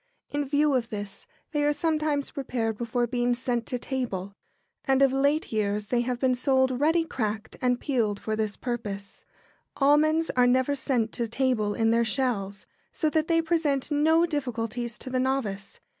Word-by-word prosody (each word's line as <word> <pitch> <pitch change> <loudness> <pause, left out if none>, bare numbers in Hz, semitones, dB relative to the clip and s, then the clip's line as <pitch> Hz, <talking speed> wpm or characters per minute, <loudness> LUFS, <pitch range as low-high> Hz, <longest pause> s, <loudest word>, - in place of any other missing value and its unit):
In 290 0 -1
view 290 +1 +2
of 240 -3 0
this, 205 -2 -7 0.2
they 295 -1 0
are 295 - +3
sometimes 305 -2 0
prepared 240 -5 -2
before 240 +2 -1
being 245 0 0
sent 240 -2 -2
to 250 - -2
table, 230 -7 -4 0.5
and 265 0 +2
of 270 -1 +4
late 285 +4 +1
years 210 -1 -1
they 245 -1 +2
have 245 0 -2
been 260 -1 +2
sold 260 0 +2
ready 325 +2 +3
cracked 220 -7 -3
and 250 -1 +2
peeled 225 -7 0
for 220 - -2
this 215 -2 -1
purpose. 210 -5 -5 0.5
[Sidenote: 275 0 +4
Almonds.] 300 +1 +5
Almonds 320 +1 0
are 250 0 +5
never 260 +3 +2
sent 250 -5 0
to 235 -2 -2
table 230 -4 0
in 225 0 +2
their 230 +1 +3
shells, 215 -4 -1 0.3
so 310 -2 0
that 315 0 +1
they 330 -1 +2
present 315 -4 0
no 320 +3 +4
difficulties 240 -6 -3
to 255 - -7
the 255 - +1
novice. 255 -7 -2
255 Hz, 180 wpm, -27 LUFS, 225-285 Hz, 0.5 s, Almonds